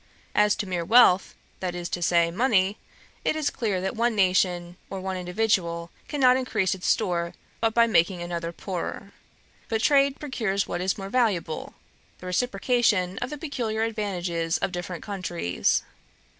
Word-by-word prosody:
As 210 Hz, 0 st, +4 dB
to -, -, -3 dB
mere 180 Hz, -2 st, -2 dB
wealth, 200 Hz, -2 st, +5 dB, 0.2 s
that 180 Hz, -2 st, -3 dB
is 175 Hz, -1 st, -4 dB
to 175 Hz, -, -3 dB
say, 170 Hz, -1 st, +3 dB
money, 200 Hz, -1 st, +2 dB, 0.4 s
it -, -, +1 dB
is 310 Hz, -2 st, 0 dB
clear 210 Hz, -6 st, -1 dB
that 190 Hz, +5 st, -2 dB
one 235 Hz, 0 st, +1 dB
nation 180 Hz, -2 st, +2 dB
or 195 Hz, -, -5 dB
one 190 Hz, 0 st, -3 dB
individual 180 Hz, -3 st, -1 dB, 0.2 s
cannot 255 Hz, -3 st, +4 dB
increase 215 Hz, -7 st, 0 dB
its 185 Hz, -1 st, -5 dB
store 175 Hz, -5 st, 0 dB, 0.2 s
but 225 Hz, -1 st, +1 dB
by 235 Hz, 0 st, +6 dB
making 180 Hz, -5 st, +2 dB
another 170 Hz, -1 st, -4 dB
poorer: 180 Hz, 0 st, -5 dB, 0.6 s
but 225 Hz, -, 0 dB
trade 280 Hz, -1 st, +4 dB
procures 220 Hz, -9 st, -1 dB
what -, -, -3 dB
is 190 Hz, +3 st, 0 dB
more 195 Hz, -1 st, -6 dB
valuable, 195 Hz, -10 st, 0 dB, 0.4 s
the -, -, -12 dB
reciprocation 200 Hz, -1 st, +1 dB
of -, -, -3 dB
the 300 Hz, -, -5 dB
peculiar 235 Hz, -8 st, -2 dB
advantages 180 Hz, -7 st, -1 dB
of -, -, -2 dB
different 175 Hz, -1 st, -5 dB
countries. 175 Hz, -, -1 dB
190 Hz, 155 wpm, -26 LUFS, 175-225 Hz, 0.6 s, by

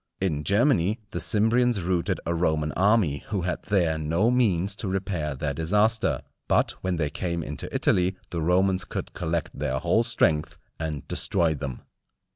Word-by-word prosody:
In 80 Hz, -6 st, -1 dB
Germany 105 Hz, -, +2 dB
the 85 Hz, -, -3 dB
Cimbrians 115 Hz, +6 st, +3 dB
routed 90 Hz, -2 st, 0 dB
a 85 Hz, -, 0 dB
Roman 80 Hz, -3 st, 0 dB
army 95 Hz, -4 st, +2 dB
who 100 Hz, -3 st, -2 dB
had 90 Hz, 0 st, -2 dB
there 85 Hz, -6 st, +1 dB
no 85 Hz, +9 st, +1 dB
means 100 Hz, -6 st, +1 dB
to 105 Hz, -, -5 dB
repair 95 Hz, -6 st, -2 dB
their 70 Hz, +1 st, -2 dB
disaster; 105 Hz, +9 st, +2 dB, 0.2 s
but -, -, +3 dB
when 95 Hz, -1 st, -1 dB
they 75 Hz, -3 st, -1 dB
came 85 Hz, -2 st, -3 dB
into -, -, -5 dB
Italy, 90 Hz, +1 st, +1 dB, 0.2 s
the 85 Hz, -, -2 dB
Romans 95 Hz, +3 st, +2 dB
could -, -, -6 dB
collect 80 Hz, 0 st, -2 dB
their 65 Hz, -, -2 dB
whole 85 Hz, -, +2 dB
strength, 80 Hz, -9 st, +1 dB, 0.2 s
and 75 Hz, -4 st, -4 dB
destroy 85 Hz, -4 st, +1 dB
them. 70 Hz, -4 st, -5 dB
90 Hz, 160 wpm, -26 LUFS, 80-100 Hz, 0.2 s, Cimbrians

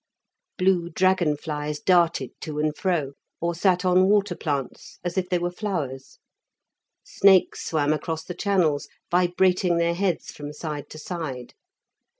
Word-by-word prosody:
Blue 185 Hz, -3 st, +2 dB
dragon 180 Hz, -5 st, +2 dB
flies 150 Hz, 0 st, -4 dB
darted 170 Hz, -8 st, +2 dB
to 150 Hz, -1 st, -5 dB
and 150 Hz, 0 st, 0 dB
fro, 165 Hz, -8 st, -1 dB, 0.3 s
or 170 Hz, +1 st, -1 dB
sat 180 Hz, +1 st, +1 dB
on 185 Hz, +1 st, +4 dB
water 205 Hz, -1 st, +2 dB
plants 140 Hz, -5 st, -4 dB
as 175 Hz, -1 st, -3 dB
if 185 Hz, -1 st, -1 dB
they 180 Hz, -, +2 dB
were 175 Hz, 0 st, -2 dB
flowers. 155 Hz, -10 st, -4 dB, 0.9 s
Snakes 195 Hz, -2 st, +3 dB
swam 150 Hz, -2 st, +1 dB
across 160 Hz, +1 st, -3 dB
the 180 Hz, -, -6 dB
channels, 175 Hz, -7 st, +1 dB, 0.2 s
vibrating 180 Hz, 0 st, +2 dB
their 170 Hz, 0 st, +2 dB
heads 180 Hz, -1 st, -1 dB
from 145 Hz, 0 st, -8 dB
side 150 Hz, -2 st, -6 dB
to -, -, -10 dB
side. 155 Hz, -7 st, -6 dB
170 Hz, 145 wpm, -25 LUFS, 150-185 Hz, 0.9 s, on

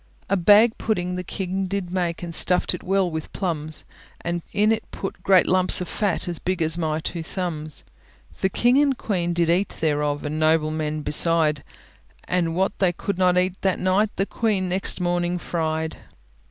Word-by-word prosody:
A -, -, +4 dB
bag 210 Hz, +5 st, +5 dB
pudding 180 Hz, -5 st, -1 dB
the 180 Hz, -, -4 dB
king 190 Hz, +1 st, -3 dB
did 190 Hz, -2 st, -3 dB
make, 175 Hz, -2 st, -2 dB
And 170 Hz, -1 st, -5 dB
stuffed 180 Hz, +3 st, +2 dB
it 180 Hz, -, -5 dB
well 190 Hz, -1 st, +1 dB
with 160 Hz, 0 st, -5 dB
plums; 155 Hz, -5 st, -3 dB, 0.4 s
And 170 Hz, 0 st, -2 dB
in 210 Hz, +2 st, +2 dB
it 225 Hz, -1 st, -2 dB
put 195 Hz, -, -6 dB
great 190 Hz, -2 st, +5 dB
lumps 185 Hz, 0 st, +3 dB
of 180 Hz, -, -4 dB
fat, 200 Hz, -2 st, -1 dB
As 175 Hz, -2 st, -3 dB
big 185 Hz, 0 st, -2 dB
as 160 Hz, 0 st, -1 dB
my 160 Hz, -2 st, -1 dB
two 165 Hz, +1 st, -4 dB
thumbs. 160 Hz, -3 st, -4 dB, 0.6 s
The 190 Hz, -, +1 dB
king 245 Hz, +7 st, +3 dB
and 280 Hz, -3 st, +2 dB
queen 175 Hz, -5 st, -1 dB
did 170 Hz, -1 st, +1 dB
eat 180 Hz, +4 st, 0 dB
thereof, 150 Hz, -2 st, 0 dB
And 150 Hz, +1 st, -3 dB
noblemen 155 Hz, -1 st, +1 dB
beside; 150 Hz, -1 st, +3 dB, 0.6 s
And 170 Hz, -2 st, -1 dB
what 190 Hz, +2 st, 0 dB
they 185 Hz, -3 st, +2 dB
could 190 Hz, +2 st, -4 dB
not 180 Hz, -1 st, +3 dB
eat 185 Hz, +1 st, 0 dB
that 190 Hz, -1 st, +1 dB
night, 190 Hz, +3 st, +2 dB
The 195 Hz, -, 0 dB
queen 205 Hz, -4 st, -1 dB
next 185 Hz, +2 st, 0 dB
morning 175 Hz, 0 st, 0 dB
fried. 160 Hz, -2 st, -2 dB
180 Hz, 180 wpm, -23 LUFS, 160-190 Hz, 0.6 s, bag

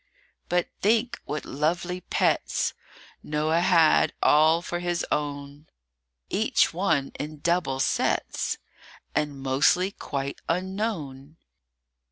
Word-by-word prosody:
BUT 175 Hz, 0 st, +1 dB
think 230 Hz, +4 st, +1 dB
what 150 Hz, 0 st, -4 dB
lovely 175 Hz, +5 st, -1 dB
pets -, -, 0 dB, 0.5 s
Noah 155 Hz, +2 st, 0 dB
had 170 Hz, -3 st, +4 dB
all 160 Hz, +3 st, +5 dB
for 175 Hz, -, -3 dB
his 175 Hz, -1 st, -1 dB
own; 145 Hz, 0 st, -3 dB, 0.6 s
Each -, -, +2 dB
one 140 Hz, -1 st, 0 dB
in 150 Hz, +1 st, -5 dB
double 170 Hz, -6 st, 0 dB
sets, -, -, 0 dB, 0.6 s
And 145 Hz, -2 st, -1 dB
mostly 140 Hz, +8 st, +2 dB
quite 140 Hz, -7 st, -5 dB
unknown. 165 Hz, -6 st, -3 dB
155 Hz, 100 wpm, -26 LUFS, 145-180 Hz, 0.6 s, all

